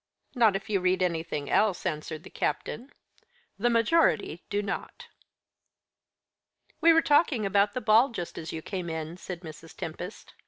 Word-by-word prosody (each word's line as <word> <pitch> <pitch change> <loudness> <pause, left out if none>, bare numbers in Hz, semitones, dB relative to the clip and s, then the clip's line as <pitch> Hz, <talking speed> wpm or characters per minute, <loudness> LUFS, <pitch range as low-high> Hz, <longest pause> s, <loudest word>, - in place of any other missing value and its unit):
"Not 225 -6 +4
if 195 - -4
you 205 -2 +1
read 185 0 +2
anything 160 -4 -2
else," 205 -4 +2
answered 155 -2 -3
the - - -12
captain. 250 +5 -3 0.7
"The 240 +4 +2
majority 230 - +2
do 205 0 -1
not." 200 - -6 1.7
"We 335 +1 +7
were 325 0 +5
talking 290 -7 +3
about 200 +1 +2
the 255 - -3
ball 225 +4 +5
just 175 -7 -6
as 160 -1 -6
you 160 -1 -6
came 185 -4 -4
in," 160 +1 -5
said 180 -2 -7
Mrs. 160 -1 -11
Tempest. 175 +5 -7
195 Hz, 155 wpm, -28 LUFS, 165-230 Hz, 1.7 s, We